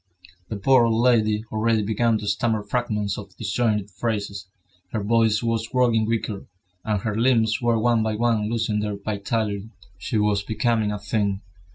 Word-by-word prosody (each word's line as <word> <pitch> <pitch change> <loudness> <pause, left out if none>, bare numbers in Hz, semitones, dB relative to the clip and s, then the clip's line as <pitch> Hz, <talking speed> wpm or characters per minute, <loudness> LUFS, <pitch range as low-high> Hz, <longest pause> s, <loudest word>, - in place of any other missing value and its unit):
The - - -3
poor 125 +4 +4
old 115 0 +1
lady 110 -3 +3
already 110 0 +1
began 110 +2 +1
to 105 - -6
stammer 110 +1 0
fragments 105 -2 -2
of 105 - -12
disjointed 105 -1 -1
phrases; 100 -2 -3 0.5
her 110 - -1
voice 110 0 +2
was 115 -1 -1
growing 120 -3 +2
weaker, 110 -3 -2 0.4
and 105 -3 -1
her 105 0 -2
limbs 115 -1 +2
were 120 -1 +2
one 115 0 +2
by 110 -1 -1
one 110 -2 +1
losing 110 -2 0
their 105 -1 -2
vitality. 105 0 -2 0.3
She 110 - -2
was 105 -1 +2
becoming 110 0 0
a 105 - -3
thing. 100 -1 -1
110 Hz, 165 wpm, -23 LUFS, 105-115 Hz, 0.5 s, poor